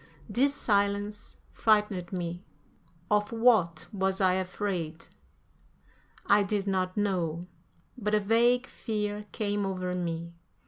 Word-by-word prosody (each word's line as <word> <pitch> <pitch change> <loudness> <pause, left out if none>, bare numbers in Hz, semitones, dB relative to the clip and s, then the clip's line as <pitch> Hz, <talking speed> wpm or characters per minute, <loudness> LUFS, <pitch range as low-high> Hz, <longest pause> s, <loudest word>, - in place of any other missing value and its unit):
This 265 +6 +2
silence 205 -1 0
frightened 210 -5 +2
me. 175 -1 -4 0.7
Of 210 +1 +2
what 215 -9 +3
was 190 -1 0
I 185 -2 +4
afraid? 185 -3 -3 1.2
I 205 +1 +5
did 200 0 -1
not 185 -1 -1
know, 175 -5 0 0.5
but 215 -4 0
a - - +4
vague 235 +4 +3
fear 210 -3 -3
came 205 -1 -1
over 185 -2 -2
me. 170 -1 -3
200 Hz, 110 wpm, -29 LUFS, 180-210 Hz, 1.2 s, I